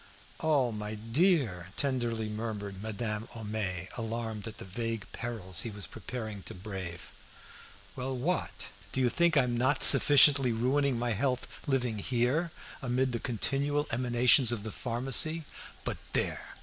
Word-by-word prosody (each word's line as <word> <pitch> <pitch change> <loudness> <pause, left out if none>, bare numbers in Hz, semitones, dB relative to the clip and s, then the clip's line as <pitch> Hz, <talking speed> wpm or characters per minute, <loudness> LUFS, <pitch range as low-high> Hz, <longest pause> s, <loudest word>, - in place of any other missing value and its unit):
"Oh, 145 -7 +1
my 105 0 -5
dear!" 115 - +1
tenderly 120 -5 -1
murmured 105 -3 -5
Madame 110 0 -4
Homais, 105 -5 -3
alarmed 115 -2 -5
at 110 - -9
the - - -9
vague 115 +2 -4
perils 100 -7 -2
he 115 - -3
was 105 -1 -7
preparing 110 -5 -7
to - - -9
brave. 95 -3 -7 0.8
"Well, 130 0 -4
what? 170 +8 -2 0.3
Do - - -2
you 125 -2 +3
think 170 -2 +2
I'm 125 -3 +2
not 130 +4 +2
sufficiently 140 -3 +9
ruining 130 +3 +1
my 120 0 -1
health 125 +4 -1 0.2
living 125 -6 -1
here 125 - 0 0.3
amid 130 0 0
the 120 - -3
continual 140 +6 -1
emanations 120 +1 +3
of 115 -4 -3
the 110 - -6
pharmacy? 135 +8 0 0.4
But - - -3 0.2
there! - - -2
120 Hz, 140 wpm, -29 LUFS, 110-130 Hz, 0.8 s, sufficiently